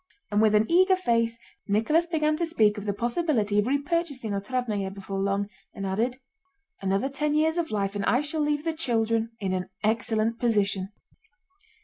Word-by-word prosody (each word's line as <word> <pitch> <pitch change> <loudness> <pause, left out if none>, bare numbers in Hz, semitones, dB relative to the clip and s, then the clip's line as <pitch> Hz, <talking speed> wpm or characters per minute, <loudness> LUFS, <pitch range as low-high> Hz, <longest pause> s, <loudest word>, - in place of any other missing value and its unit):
And 205 +1 +3
with 215 -1 +4
an 210 +1 +4
eager 375 +2 +5
face 230 -9 +1 0.3
Nicholas 225 +12 +2
began 310 -2 +1
to 340 - 0
speak 215 -9 +2
of 205 - -8
the - - +2
possibility 235 - +1
of 205 - +2
repurchasing 285 -3 -1
Otrádnoe 205 -1 -2
before 195 0 -5
long, 200 +1 0 0.3
and 195 - -4
added: 230 +7 -1 0.6
"Another 195 +6 +1
ten 295 +2 -1
years 320 +2 +2
of 335 - -1
life 200 -1 -1
and 200 - -2
I 245 - +3
shall 305 +1 -2
leave 295 0 0
the 325 0 -1
children... 230 -6 0
in 190 -2 -1
an 185 0 -3
excellent 225 +1 0
position." 205 -5 +1
230 Hz, 170 wpm, -26 LUFS, 205-300 Hz, 0.6 s, eager